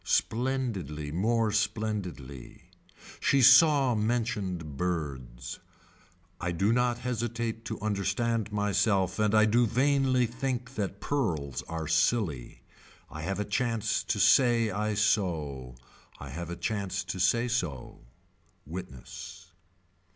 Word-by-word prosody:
Splendidly 110 - -1
more 110 +6 +1
splendidly. 100 - -3 0.5
She 135 -2 +3
saw 135 0 +7
mentioned 105 - -2
birds. 70 -8 -4 0.8
I 90 - -2
do 100 +6 +2
not 125 -1 +1
hesitate 115 -2 -3
to 110 - -5
understand 110 +2 -1
myself 100 -2 +1
and 105 0 +2
I 110 0 +6
do 120 +2 +3
vainly 130 +1 +2
think 125 +1 -3
that 100 -3 -4
pearls 85 - -1
are 80 -1 -4
silly. 80 - 0 0.5
I 75 - -7
have 95 +5 -3
a 105 - -1
chance 115 0 0
to - - -1
say 120 -4 +4
I 105 +2 -1
sew. 80 - 0 0.4
I 70 - -8
have 85 +3 -6
a 85 - -4
chance 100 0 -2
to 95 - -5
say 115 +7 +2
so. 90 - -3 0.7
Witness. 85 +2 -9
105 Hz, 115 wpm, -29 LUFS, 85-120 Hz, 0.8 s, saw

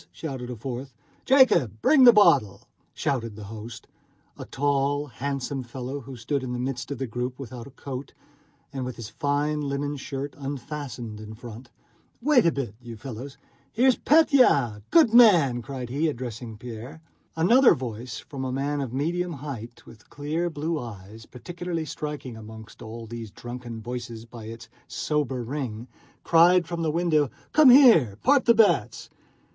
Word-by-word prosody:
shouted 130 -6 -6
a 125 - -5
fourth. 125 +2 -7 0.3
"Jacob, 255 - +4
bring 270 -5 +6
a - - +12
bottle!" 170 - +3 0.2
shouted 115 -6 -2
the 105 - -9
host, 110 +1 -9 0.5
a - - -8
tall, 145 +1 0
handsome 140 +1 -4
fellow 130 +3 -6
who 135 0 -10
stood 135 +5 -2
in 125 -1 -4
the - - -3
midst 125 -1 -4
of 140 - -4
the 135 - -3
group, 125 +2 -4
without 125 -2 -8
a 135 - -17
coat, 135 0 -7 0.6
and 135 -1 -3
with 125 0 -5
his 115 -3 -8
fine 145 +4 -1
linen 145 +1 -2
shirt 140 0 -5
unfastened 135 -5 -6
in 110 0 -9
front. 120 +1 -11 0.5
"Wait 250 - +4
a - - +4
bit, 130 -9 -4
you 115 -2 -9
fellows.... 130 +3 -8 0.3
Here 245 +4 +2
is 255 - +4
Pétya! 250 - +4
Good 310 -9 +5
man!" 170 - +6
cried 130 -1 -6
he, 145 +6 0
addressing 120 -5 -5
Pierre. 120 +6 -9 0.4
Another 235 +11 +5
voice, 120 0 -6
from 135 -2 -7
a 130 - -3
man 140 +2 -1
of 130 -4 -4
medium 170 +6 -2
height 130 -5 -8
with 110 - -16
clear 155 +4 -2
blue 160 0 -3
eyes, 110 -2 -10
particularly 170 +4 -5
striking 150 -5 -6
among 110 0 -10
all 115 0 -8
these 115 -1 -7
drunken 120 +1 -8
voices 115 -1 -7
by 115 -1 -11
its 115 0 -9 0.2
sober 150 -6 -2
ring, 120 -3 -5 0.4
cried 170 +1 +5
from 170 0 -4
the 160 - 0
window: 155 -3 +1 0.2
"Come 300 -3 +7
here; 225 - +7
part 275 +1 +4
the 235 - +5
bets!" 220 -1 +2
135 Hz, 160 wpm, -25 LUFS, 120-155 Hz, 0.6 s, a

